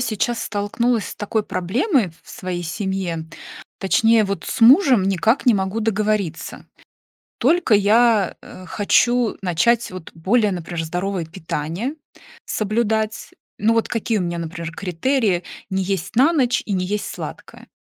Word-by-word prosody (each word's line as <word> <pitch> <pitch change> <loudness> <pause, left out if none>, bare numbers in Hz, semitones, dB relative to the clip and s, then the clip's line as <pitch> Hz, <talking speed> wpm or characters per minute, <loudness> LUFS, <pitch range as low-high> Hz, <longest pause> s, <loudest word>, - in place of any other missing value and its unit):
сейчас 235 0 -1
столкнулась 220 +3 -1
с - - -7
такой 215 +1 -1
проблемой 205 - 0
в - - -16
своей 180 -2 -5
семье- 175 -2 -3 0.5
точнее, 220 +4 +3
вот 200 0 -3
с - - -4
мужем 255 - +6
никак 195 +8 +1
не 240 - +6
могу 190 +2 -1
договориться. 215 -5 -2 0.7
Только 315 0 +3
я, 210 0 +4
э, 185 - -12
хочу 240 +5 +2
начать, 200 +6 +2
вот 185 -3 -9
более, 205 +6 +1
например, 170 -2 -4
здоровое 180 +2 -3
питание 165 - -4 0.5
соблюдать. 220 0 -1 0.3
Ну 220 +3 +2
вот 230 -1 +1
какие 230 -1 -1
у - - -1
меня, 170 -1 -2
например, 165 0 -5
критерии: 195 +1 0 0.3
не 190 0 0
есть 190 0 -3
на 275 +8 +5
ночь, 255 -6 +2
и 205 - -2
не 185 -1 0
есть 205 +2 -2
сладкое. - - -9
205 Hz, 140 wpm, -21 LUFS, 180-230 Hz, 0.7 s, мужем